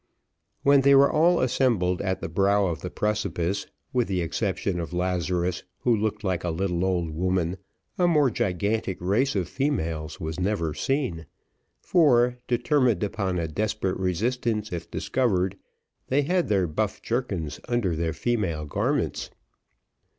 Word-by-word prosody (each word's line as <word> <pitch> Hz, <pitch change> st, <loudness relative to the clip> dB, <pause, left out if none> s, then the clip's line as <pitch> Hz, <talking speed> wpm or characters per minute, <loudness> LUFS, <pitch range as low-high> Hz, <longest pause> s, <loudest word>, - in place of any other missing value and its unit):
When 140 Hz, 0 st, +6 dB
they 140 Hz, +1 st, +6 dB
were 140 Hz, +1 st, +6 dB
all 170 Hz, +3 st, +4 dB
assembled 115 Hz, -8 st, +1 dB
at 95 Hz, -1 st, -2 dB
the -, -, -3 dB
brow 100 Hz, +4 st, +2 dB
of 85 Hz, -3 st, -2 dB
the 90 Hz, -, -4 dB
precipice, 100 Hz, -2 st, -1 dB, 0.3 s
with 125 Hz, -2 st, +2 dB
the 95 Hz, -2 st, -1 dB
exception 95 Hz, +1 st, -1 dB
of 85 Hz, +1 st, -5 dB
Lazarus, 90 Hz, 0 st, -1 dB, 0.2 s
who 120 Hz, -2 st, +3 dB
looked 110 Hz, +1 st, -2 dB
like 90 Hz, -4 st, -1 dB
a 90 Hz, -, -1 dB
little 90 Hz, +1 st, -1 dB
old 90 Hz, -3 st, 0 dB
woman, 90 Hz, +1 st, 0 dB, 0.4 s
a 175 Hz, -, +4 dB
more 150 Hz, -6 st, +4 dB
gigantic 100 Hz, +1 st, -1 dB
race 105 Hz, +10 st, +1 dB
of 95 Hz, -4 st, 0 dB
females 80 Hz, -, -2 dB
was 80 Hz, +1 st, -4 dB
never 90 Hz, -5 st, 0 dB
seen; 125 Hz, -, -2 dB, 0.6 s
for, 125 Hz, -8 st, +4 dB
determined 120 Hz, -, +2 dB
upon 100 Hz, -3 st, -1 dB
a 85 Hz, -1 st, -1 dB
desperate 105 Hz, +2 st, -2 dB
resistance 110 Hz, +4 st, -1 dB
if 85 Hz, -1 st, -5 dB
discovered, 100 Hz, -7 st, 0 dB, 0.5 s
they 140 Hz, +3 st, +2 dB
had 175 Hz, +4 st, +1 dB
their 100 Hz, -3 st, +2 dB
buff 100 Hz, +6 st, -2 dB
jerkins 95 Hz, -, -2 dB
under 120 Hz, -8 st, 0 dB
their 80 Hz, 0 st, -1 dB
female 95 Hz, -11 st, -1 dB
garments. 75 Hz, -, -1 dB
100 Hz, 145 wpm, -26 LUFS, 90-120 Hz, 0.6 s, When